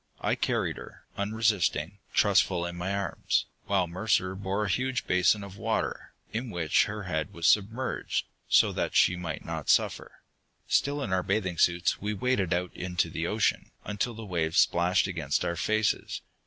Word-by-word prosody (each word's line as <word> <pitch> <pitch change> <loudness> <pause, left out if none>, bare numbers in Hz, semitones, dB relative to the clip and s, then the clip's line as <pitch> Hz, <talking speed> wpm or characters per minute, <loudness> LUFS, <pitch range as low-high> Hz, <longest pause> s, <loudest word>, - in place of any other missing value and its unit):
I - - 0
carried - - -1
her, - - -12
unresisting, 100 -4 0
trustful, 95 -3 +3
in 85 0 -5
my 90 +2 -3
arms, 100 0 0 0.2
while 95 -2 +2
Mercer 95 +1 0
bore 100 +2 -2
a - - -1
huge 130 +5 -1
basin 90 +3 +3
of 100 0 -10
water, - - -2 0.2
in 120 +3 -3
which 85 -6 +2
her 105 0 -5
head 80 -4 -2
was 85 -1 -4
submerged, 110 +6 +1 0.2
so - - +5
that - - -2
she 95 - +5
might 85 -3 -5
not - - -5
suffer. - - +1 0.4
Still 145 0 +1
in 100 - -2
our 95 - +2
bathing 95 -3 -1
suits 85 0 +2
we 105 +1 -2
waded 105 -5 0
out 90 0 -1
into 90 0 -1
the - - -2
ocean, - - 0 0.2
until 110 +3 -2
the 110 0 -8
waves 85 -3 -1
splashed 90 +2 +3
against 80 -6 -1
our 85 - -1
faces. 110 +3 0
95 Hz, 170 wpm, -28 LUFS, 90-105 Hz, 0.4 s, so